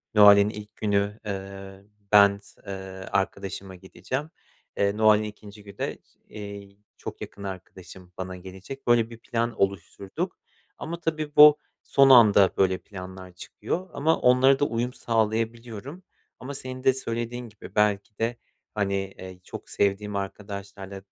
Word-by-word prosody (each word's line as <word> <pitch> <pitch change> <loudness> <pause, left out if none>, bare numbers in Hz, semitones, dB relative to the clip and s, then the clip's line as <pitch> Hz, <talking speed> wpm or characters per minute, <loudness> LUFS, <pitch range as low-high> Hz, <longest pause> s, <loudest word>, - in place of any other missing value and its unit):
Noel'in 100 -1 +8
ilk 105 0 -9
günü, 105 0 0
eee, 95 -1 -7 0.3
ben 100 -1 +7
s 100 - -19
eee, 100 - -4 0.4
arkadaşıma 95 -1 -2
gideceğim. 130 - -5 0.5
Eee, 100 +1 +1
Noel'in 110 -1 +5
2'nci 105 0 -10
günü 100 -2 -13
de, - - -3 0.3
iii, 100 -1 -9 0.2
çok - - -8
yakın 100 - -8
arkadaşım 95 -1 -9
bana 95 0 -5
gelecek. 95 +9 -10
Böyle 120 -1 +4
bir 115 - -10
plan 115 0 -3
oluşturduk 100 - -2 0.4
ama 170 +1 -5
tabii 155 -3 -3
bu 150 0 +9 0.3
son 135 -1 +5
anda 105 -6 +7
böyle 95 -1 +3
planlar 95 -1 -10
çıkıyor 165 - -5
ama 160 +3 +1
onlara 130 +2 +5
da 145 - +3
uyum 120 0 -2
sağlayabiliyorum. 115 - -2 0.4
Ama 135 +3 -7
senin 130 -2 -7
de 130 - +5
söylediğin 120 -1 -4
gibi 105 -1 -13
belki 105 0 +1
de, 115 +1 -1 0.4
hani, 100 -2 0 0.2
eee, 95 -1 -10
çok - - -9
sevdiğim 100 +1 0
arkadaşlarla, 100 0 -6
eee, 95 - -8
105 Hz, 140 wpm, -26 LUFS, 100-120 Hz, 0.5 s, bu